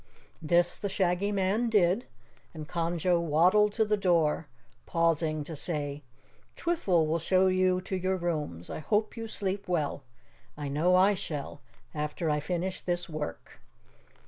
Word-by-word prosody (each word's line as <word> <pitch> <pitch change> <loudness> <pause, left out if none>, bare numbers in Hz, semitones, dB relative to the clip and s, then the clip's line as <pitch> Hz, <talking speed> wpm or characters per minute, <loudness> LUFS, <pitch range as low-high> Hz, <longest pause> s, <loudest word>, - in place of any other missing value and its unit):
This 175 +2 +2
the 200 - -3
Shaggy 190 +1 0
Man 205 +4 +1
did 200 +1 +2 0.5
and 155 -1 -7
Conjo 170 +1 0
waddled 180 +7 +4
to 220 0 +2
the 210 0 +2
door, 170 -6 +1 0.4
pausing 165 -2 +1
to 160 +2 -6
say, 145 -2 -2 0.5
"Twiffle 195 - +1
will 160 +2 0
show 185 +3 +3
you 185 0 +3
to 190 +1 -4
your 185 +1 0
rooms. 150 - -3
I - - -4
hope 210 +7 0
you 225 -1 -5
sleep 200 -2 -3
well. 155 -6 -1 0.6
I 145 -2 -4
know 165 +6 +2
I 190 +3 +5
shall, 150 -6 -5 0.3
after 150 +1 -2
I 150 - +1
finish 180 +5 -3
this 175 -1 -2
work." 155 -2 -7
175 Hz, 145 wpm, -29 LUFS, 155-190 Hz, 0.6 s, I